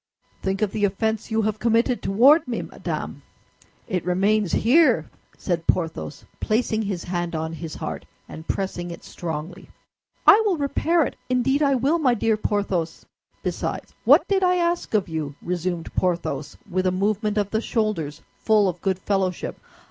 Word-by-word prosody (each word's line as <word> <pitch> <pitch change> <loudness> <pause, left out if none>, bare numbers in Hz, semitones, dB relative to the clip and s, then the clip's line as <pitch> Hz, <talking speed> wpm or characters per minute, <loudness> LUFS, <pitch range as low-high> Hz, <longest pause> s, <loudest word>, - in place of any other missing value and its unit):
"Think 195 +2 -1
of 205 - 0
the 215 - -2
offense 220 +2 -1
you 220 0 +1
have 215 0 -1
committed 235 +2 +2
toward 270 +10 +5
me, 240 - -2
madame! - - -5 0.7
It 185 -6 -1
remains 195 +2 +1
here!" 245 - +4 0.3
said 170 -3 -2
Porthos, 165 -4 -1
placing 220 0 0
his 195 -5 -3
hand 175 -2 -3
on 160 +1 -3
his 165 -1 -6
heart, - - -6 0.2
and 160 +1 -10
pressing 180 -2 -3
it 170 - -9
strongly. 165 +2 -6 0.6
"I 435 - +8
will 395 -5 +1
repair 310 +3 +1
it, - - -6
indeed 265 +3 +2
I 280 -2 +3
will, 280 +7 +2
my 255 -6 +3
dear 225 0 +2
Porthos." 200 -6 -2 0.4
"Besides, - - -3
what - - +6
did 390 -1 +2
I 360 0 +4
ask 345 -7 0
of 205 -3 +2
you?" 155 -4 -4
resumed 175 -1 -3
Porthos, 155 -6 -1
with 185 -1 0
a - - +3
movement 210 +3 0
of 205 -1 0
the 220 - 0
shoulders 215 -12 -2 0.2
full 215 -2 +3
of 180 -2 -3
good 190 -2 0
fellowship. 190 -2 -2
205 Hz, 165 wpm, -23 LUFS, 175-235 Hz, 0.7 s, I